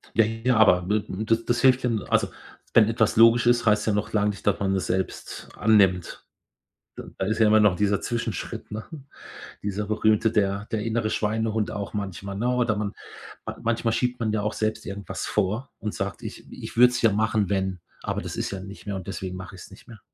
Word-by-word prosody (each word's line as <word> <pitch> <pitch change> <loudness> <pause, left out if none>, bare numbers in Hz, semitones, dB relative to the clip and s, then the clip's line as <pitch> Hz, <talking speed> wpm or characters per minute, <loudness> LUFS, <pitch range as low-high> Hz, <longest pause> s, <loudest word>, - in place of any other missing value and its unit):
Ja 115 - +5
ja, 115 +2 0
aber 90 -5 +4
wird 105 0 0
n 110 +4 -4
das 115 +1 +1
das 120 0 0
hilft 130 -1 +4
ja 125 - +2 0.2
also, - - +2 0.5
wenn 110 -2 +6
etwas 110 -2 +1
logisch 115 +1 +6
ist, 120 -1 +3
heißt 105 0 +3
ja 110 - +2
noch 105 +1 -2
lange 105 -1 +2
nicht, 100 - -9
dass 100 - +3
man 95 -1 +1
es 95 - -1
selbst 95 0 -3
annimmt. 100 -5 +2 0.7
D - - -6
da 95 - -1
ist 110 +3 -1
ja 110 - +5
immer 110 0 +5
noch 105 -3 +4
dieser 105 +1 +1
Zwischenschritt, 120 -3 -4
ne? 110 +1 -5 0.8
Dieser 100 +1 -3
berühmte 110 +1 +2
der 100 -1 0
der 110 -2 -1
innere 115 -1 -1
Schweinehund 110 0 -1
auch 105 -1 -5
manchmal, 100 -1 -5
ne? 120 +4 -1
Oder 120 -3 +1
man 105 -1 -2 0.5
man - - -5
manchmal 115 0 0
schiebt 125 0 -1
man 110 -2 0
ja 105 -2 0
auch 105 - -1
selbst 110 0 -2
irgendwas 100 -1 -5
vor 105 +6 -1
und 105 - -4
sagt: - - -4
„Ich - - -9
ich - - -9
würde 125 +1 +7
es 120 -1 -3
ja 115 -3 +5
machen, 110 -1 +1
wenn, 95 -2 -1 0.2
aber - - -2
das - - -6
ist - - -2
ja 95 -1 -5
nicht 100 +2 -11
mehr 100 -1 -3
und 95 - -7
deswegen 90 -1 -5
mach 95 +1 -8
ich 95 - -11
es - - -13
nicht - - -16
mehr.“ 110 -3 -12
105 Hz, 225 wpm, -25 LUFS, 100-115 Hz, 0.8 s, würde